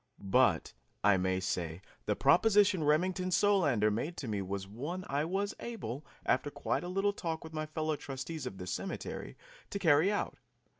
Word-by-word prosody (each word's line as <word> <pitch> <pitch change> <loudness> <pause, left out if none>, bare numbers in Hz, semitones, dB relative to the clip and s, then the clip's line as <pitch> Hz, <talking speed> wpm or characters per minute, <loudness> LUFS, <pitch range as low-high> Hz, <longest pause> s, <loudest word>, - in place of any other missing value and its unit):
But, 115 -11 +4 0.3
I 100 -1 +6
may 95 0 +1
say, 85 -3 -2 0.3
the 105 - +2
proposition 195 - +4
Remington 180 +5 +2
Solander 160 - +3
made 150 +11 -2
to 135 - -5
me 105 -3 -1
was 95 0 -4
one 150 - -5
I 145 +2 0
was 195 +4 -1
able, 150 - -5 0.2
after 140 +3 +2
quite - - -2
a - - -4
little 195 +2 +1
talk 165 -5 -3
with 160 0 -10
my 155 0 -3
fellow 155 0 -1
trustees 140 +1 -5
of 95 - -7
the 90 - -6
cemetery, 140 - -5 0.3
to - - -3
carry 165 0 +4
out. 205 - -2
150 Hz, 170 wpm, -32 LUFS, -, 0.3 s, I